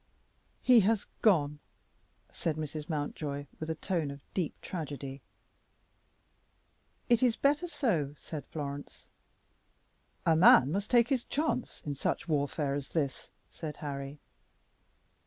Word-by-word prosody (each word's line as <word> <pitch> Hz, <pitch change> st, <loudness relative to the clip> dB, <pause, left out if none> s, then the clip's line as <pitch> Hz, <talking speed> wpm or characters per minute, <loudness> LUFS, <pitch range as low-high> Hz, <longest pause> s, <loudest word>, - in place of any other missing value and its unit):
"He 250 Hz, -2 st, +7 dB
has 215 Hz, +1 st, +2 dB, 0.2 s
gone!" 150 Hz, -9 st, +3 dB, 0.7 s
said 160 Hz, -3 st, -2 dB
Mrs. 155 Hz, +1 st, -5 dB
Mountjoy, 145 Hz, -2 st, -3 dB
with 155 Hz, -, -4 dB
a 160 Hz, -, -1 dB
tone 165 Hz, -2 st, -1 dB
of 140 Hz, 0 st, -9 dB
deep 175 Hz, -5 st, -2 dB
tragedy. 140 Hz, -5 st, -5 dB, 1.9 s
"It 235 Hz, -2 st, +4 dB
is 245 Hz, -3 st, +4 dB
better 295 Hz, +5 st, +2 dB
so," 170 Hz, -, 0 dB
said 150 Hz, 0 st, -7 dB
Florence. 145 Hz, -3 st, -7 dB, 1.1 s
"A 165 Hz, -, +5 dB
man 145 Hz, -5 st, +7 dB
must 200 Hz, +4 st, -1 dB
take 240 Hz, 0 st, +5 dB
his 260 Hz, -4 st, +1 dB
chance 290 Hz, -4 st, -2 dB
in 145 Hz, -, -2 dB
such 140 Hz, -, -2 dB
warfare 145 Hz, -2 st, 0 dB
as 140 Hz, -1 st, -4 dB
this," 140 Hz, -5 st, -1 dB, 0.2 s
said 150 Hz, -3 st, -6 dB
Harry. 140 Hz, -1 st, -5 dB
155 Hz, 120 wpm, -31 LUFS, 145-205 Hz, 1.9 s, He